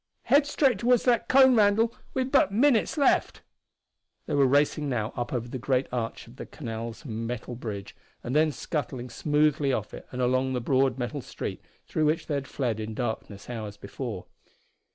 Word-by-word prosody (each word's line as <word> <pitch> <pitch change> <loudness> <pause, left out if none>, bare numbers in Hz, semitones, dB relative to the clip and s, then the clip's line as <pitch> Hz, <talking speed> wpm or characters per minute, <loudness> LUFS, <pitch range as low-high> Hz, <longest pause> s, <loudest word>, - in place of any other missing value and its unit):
"Head 285 +1 +4
straight 270 -7 +2
toward 245 0 +3
that 240 -3 +2
cone, 265 -1 +7
Randall 220 +2 +4 0.2
we've 260 0 -1
but 230 -9 +4
minutes 240 +4 +3
left!" 280 - +2 0.8
They - - -4
were 140 -2 +4
racing 145 +2 +2
now 115 -3 -2
up 120 -1 -3
over 120 -2 -2
the 130 +2 -5
great 130 +1 +1
arch 120 -2 -3
of 115 +2 -16
the - - -7
canal's 115 -1 -6
metal 115 +1 -4
bridge, 105 -5 -6 0.3
and 125 - -3
then 155 0 +4
scuttling 130 -5 -4
smoothly 150 0 +2
off - - -2
it - - -9
and 125 - -6
along 130 +1 +1
the 125 - 0
broad 130 +1 +2
metal 130 +3 -3
street - - -6 0.2
through 155 - 0
which 155 +2 +1
they 150 - -3
had 140 -2 -2
fled 120 -5 -2
in 110 0 -5
darkness 110 -4 -4
hours 110 -4 -6
before. - - -6
135 Hz, 180 wpm, -27 LUFS, 120-165 Hz, 0.8 s, cone